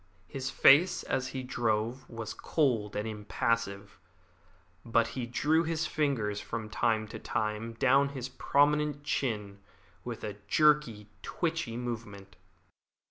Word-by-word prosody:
His 135 +5 -4
face 155 +7 +5
as 130 0 -1
he 130 -1 -5
drove 120 0 -1
was 115 -2 -6
cold 120 -10 0
and 105 +2 -2
impassive, 105 -1 -2 0.8
but 115 0 +2
he 120 0 -4
drew 150 +6 +2
his 165 -1 -1
fingers 125 -10 -1
from 110 -2 -5
time 110 -1 +1
to - - -7
time 110 +1 -2
down 135 +4 +3
his 130 -3 -5
prominent 145 +2 +1
chin 105 -9 -2 0.4
with 120 -2 -6
a 105 -2 -5
jerky, 150 -6 +3 0.2
twitchy 165 -9 -2
movement. 110 -5 -6
120 Hz, 125 wpm, -30 LUFS, 110-140 Hz, 0.8 s, face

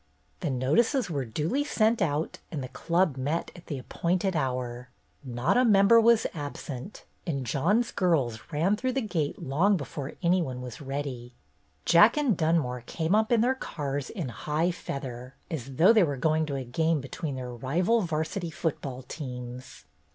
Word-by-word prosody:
The - - -2
notices 175 - +2
were 140 -4 -1
duly 155 - -1
sent 230 -5 +2
out 150 +1 -1
and 145 -5 -3
the 130 - -6
Club 170 -4 +1
met 145 +6 -2
at 175 - -14
the 145 - -3
appointed 175 +8 -1
hour. 125 -3 -2 0.3
Not 125 - 0
a 250 - +5
member 215 0 +6
was 230 0 +5
absent, 145 +1 -7 0.2
and 140 -6 -2
John's 200 - +1
girls 140 - +1
ran 165 +7 +2
through 255 +4 -1
the 270 - 0
gate 165 -9 -2
long 180 +9 +3
before 140 -2 -6
any 180 +2 +4
one 130 -6 -4
was 125 -1 -8
ready. 135 -3 -5 0.5
Jack 175 - +6
and 280 -8 +2
Dunmore 155 -7 +1
came 165 +2 -1
up 220 +2 +3
in 235 -2 +5
their 250 +3 +3
cars 145 - -4
in 175 - -4
high 150 +9 -1
feather, 130 -6 -6 0.2
as 135 -4 -5
though 185 - +6
they 220 - +6
were 145 -5 -1
going 155 +3 +1
to 140 - -3
a 135 - -3
game 160 +6 +1
between 140 +2 -5
their 125 -1 -5
rival 175 - +1
'varsity 165 +1 -2
football 140 -5 -3
teams. 125 -3 -8
155 Hz, 170 wpm, -28 LUFS, 130-185 Hz, 0.5 s, member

